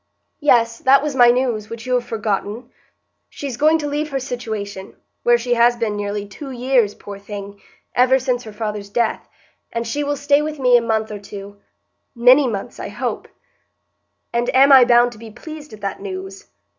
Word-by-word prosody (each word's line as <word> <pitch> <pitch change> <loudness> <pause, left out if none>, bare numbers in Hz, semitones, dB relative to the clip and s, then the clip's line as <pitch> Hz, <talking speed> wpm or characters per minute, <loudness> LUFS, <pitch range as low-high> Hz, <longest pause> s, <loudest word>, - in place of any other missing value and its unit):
"Yes; 230 -6 +3
that 275 +1 +4
was 300 -2 -2
my 245 -2 +7
news, 240 -4 0
which 230 0 -8
you 255 - -1
have 250 -1 +2
forgotten. 215 +2 -3 0.6
She's 275 -4 -6
going 310 +5 +3
to 300 -2 -4
leave 295 +1 -2
her 275 -2 -2
situation, 220 -6 -6 0.3
where 240 0 +4
she 245 +1 -1
has 240 0 +4
been 225 -3 -2
nearly 205 0 -3
two 270 +8 -9
years, 250 -4 +1
poor 200 -1 -10
thing,—ever 205 +5 -2
since 250 -2 -1
her 215 - -8
father's 210 -1 -5
death; 230 +1 -1 0.4
and 230 0 -3
she 290 +6 -2
will 290 0 -2
stay 285 +1 +3
with 305 0 -4
me 250 -2 +4
a 240 - +5
month 220 -1 -1
or 210 - -6
two,—many 200 - 0
months, 205 -5 -5
I - - -5
hope." - - -4 1.1
"And 240 +1 0
am 275 +2 +6
I 260 -2 +9
bound 240 0 +4
to 220 - -14
be 225 0 -10
pleased 300 +6 -10
at 215 - -12
that 200 -1 -4
news?" 190 -4 -7
235 Hz, 180 wpm, -20 LUFS, 205-260 Hz, 1.1 s, I